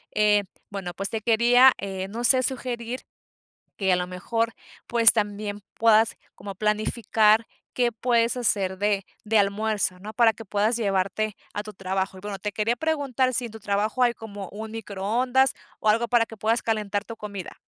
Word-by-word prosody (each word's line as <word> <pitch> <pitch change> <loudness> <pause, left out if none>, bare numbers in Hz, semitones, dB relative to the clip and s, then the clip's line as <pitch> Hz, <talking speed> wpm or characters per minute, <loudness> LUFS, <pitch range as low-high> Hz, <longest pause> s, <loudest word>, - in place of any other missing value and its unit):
Eh, 210 -1 +3 0.3
bueno, 195 -3 -5
pues 195 +2 -2
te 225 - -3
quería, 240 +3 +5
eh, 190 -1 -5
no 235 +4 -5
sé, 255 +1 +5
sugerir 245 -1 -3 0.8
que 190 -2 +1
a - - +4
lo 180 0 -2
mejor, 225 +5 -2 0.3
pues 230 -1 +7
también 205 -1 -3
puedas 225 -1 +4 0.2
como 195 0 -8
planificar 215 +1 +2 0.3
qué 245 -1 +1
puedes 235 +1 +1
hacer 195 -5 0
de 205 0 0 0.2
de 220 0 +2
almuerzo, 200 -2 0
¿no?, 210 +3 -8
para 225 -1 +4
que 225 +2 -11
puedas 210 +4 +1
llevarte 200 0 -1 0.2
a 205 - -3
tu 215 0 -9
trabajo. 190 0 -3
Y 185 - -12
bueno, 205 -1 -5
te 210 +2 -3
quería 220 +3 0
preguntar 275 -4 0
si 245 0 +1
en 230 - -8
tu 220 - -10
trabajo 210 +5 0
hay 240 -1 +3
como 205 -4 -8
un 220 +1 -7
microondas 225 +5 0 0.3
o 215 - +1
algo 230 +2 +2
para 235 0 +3
que 225 - -11
puedas 225 +3 +1
calentar 210 -2 -1
tu 230 - -8
comida. 200 -4 -7
215 Hz, 180 wpm, -25 LUFS, 200-235 Hz, 0.8 s, pues